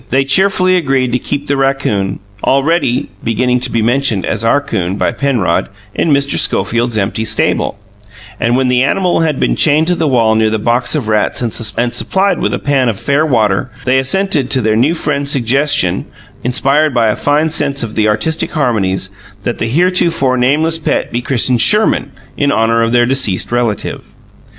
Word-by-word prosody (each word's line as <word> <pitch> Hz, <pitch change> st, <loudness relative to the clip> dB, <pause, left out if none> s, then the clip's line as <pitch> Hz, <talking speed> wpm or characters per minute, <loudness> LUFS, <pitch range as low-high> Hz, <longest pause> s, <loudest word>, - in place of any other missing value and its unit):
They 135 Hz, +1 st, +1 dB
cheerfully 185 Hz, +4 st, +2 dB
agreed 135 Hz, -6 st, 0 dB
to 125 Hz, -, 0 dB
keep 145 Hz, +3 st, -4 dB
the 140 Hz, -, -1 dB
raccoon 135 Hz, -8 st, -1 dB, 0.2 s
already 140 Hz, -2 st, +1 dB
beginning 125 Hz, +2 st, 0 dB
to 125 Hz, +1 st, -3 dB
be 115 Hz, -2 st, 0 dB
mentioned 120 Hz, -4 st, 0 dB
as 110 Hz, 0 st, -2 dB
"our 115 Hz, +5 st, +3 dB
'coon" 95 Hz, -9 st, -3 dB
by -, -, 0 dB
Penrod 120 Hz, -10 st, -1 dB, 0.2 s
in -, -, -1 dB
Mr. 140 Hz, -1 st, +1 dB
Schofield's 115 Hz, -1 st, 0 dB
empty 105 Hz, +2 st, -1 dB
stable, 110 Hz, -, 0 dB, 0.6 s
and, 120 Hz, +2 st, +1 dB
when 130 Hz, -1 st, +1 dB
the 125 Hz, 0 st, +2 dB
animal 180 Hz, +6 st, +1 dB
had 155 Hz, -4 st, 0 dB
been -, -, +1 dB
chained 155 Hz, +1 st, +3 dB
to 180 Hz, -, +2 dB
the 165 Hz, -2 st, -1 dB
wall 115 Hz, -5 st, +2 dB
near 110 Hz, 0 st, +2 dB
the 110 Hz, -, -1 dB
box 120 Hz, +3 st, 0 dB
of -, -, -2 dB
rats 110 Hz, +3 st, 0 dB
and 115 Hz, -, -2 dB, 0.4 s
supplied 190 Hz, +10 st, 0 dB
with -, -, -1 dB
a -, -, -1 dB
pan 135 Hz, -3 st, 0 dB
of 105 Hz, -3 st, -4 dB
fair 140 Hz, +6 st, +1 dB
water, 110 Hz, -3 st, +1 dB, 0.2 s
they 130 Hz, +1 st, +3 dB
assented 145 Hz, 0 st, 0 dB
to 130 Hz, -, +2 dB
their 110 Hz, -1 st, +1 dB
new 135 Hz, +9 st, +2 dB
friend's 140 Hz, -3 st, -2 dB
suggestion 140 Hz, +2 st, +1 dB, 0.4 s
(inspired 140 Hz, +3 st, +1 dB
by 115 Hz, -2 st, +2 dB
a 105 Hz, -, 0 dB
fine 150 Hz, +2 st, 0 dB
sense 140 Hz, -4 st, +1 dB
of 110 Hz, -2 st, -5 dB
the 110 Hz, -1 st, +1 dB
artistic 110 Hz, +10 st, 0 dB
harmonies) 100 Hz, -, -1 dB, 0.3 s
that 120 Hz, -, -3 dB
the 110 Hz, -, -1 dB
heretofore 170 Hz, -3 st, +1 dB
nameless 150 Hz, +6 st, +1 dB
pet 155 Hz, -, -2 dB
be 120 Hz, -, -2 dB
christened 125 Hz, -1 st, 0 dB
Sherman, 210 Hz, -, +3 dB, 0.2 s
in 140 Hz, -1 st, 0 dB
honour 115 Hz, 0 st, +1 dB
of 115 Hz, 0 st, 0 dB
their 120 Hz, 0 st, +3 dB
deceased 120 Hz, -8 st, 0 dB
relative. 120 Hz, -3 st, -3 dB
130 Hz, 185 wpm, -13 LUFS, 115-145 Hz, 0.6 s, our